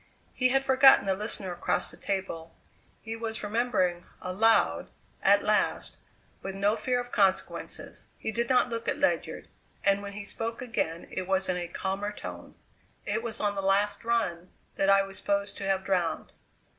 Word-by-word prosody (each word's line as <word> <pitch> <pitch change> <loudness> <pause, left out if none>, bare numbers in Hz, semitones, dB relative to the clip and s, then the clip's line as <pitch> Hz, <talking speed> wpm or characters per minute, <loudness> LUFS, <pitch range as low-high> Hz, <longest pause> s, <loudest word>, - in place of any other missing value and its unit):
He 255 0 +2
had 270 +1 +2
forgotten 265 -4 +7
the 195 - +2
listener 200 -1 -3
across 175 - -1
the - - -11
table; 190 -4 -4 0.5
he 225 0 -5
was 225 -1 -4
remembering 205 -6 0 0.2
aloud 215 +5 +2 0.3
at - - +5
last, - - +1 0.4
with 195 0 -5
no 200 +2 +2
fear 250 0 0
of 245 0 -6
consequences. 190 -2 -1
He - - -3
did 235 +1 -1
not 250 -1 +4
look 230 -1 -4
at - - 0
Ledyard, - - 0 0.4
and 200 0 +3
when 200 0 -7
he 205 +1 -6
spoke 225 +3 -4
again 175 -9 -2
it 185 -1 -4
was 190 0 +1
in 180 - +1
a 175 -1 -3
calmer 195 +4 -3
tone. 205 - -9 0.5
"It 215 +2 -1
was 230 -1 -4
on 205 -1 +1
the 195 - -3
last 200 +2 +1
run 185 -7 -1 0.3
that 195 - +2
I 195 0 +6
was 195 0 -6
supposed 200 0 -1
to 195 - -4
have 190 -1 +1
drowned. 180 -4 -1
200 Hz, 175 wpm, -28 LUFS, 190-230 Hz, 0.5 s, forgotten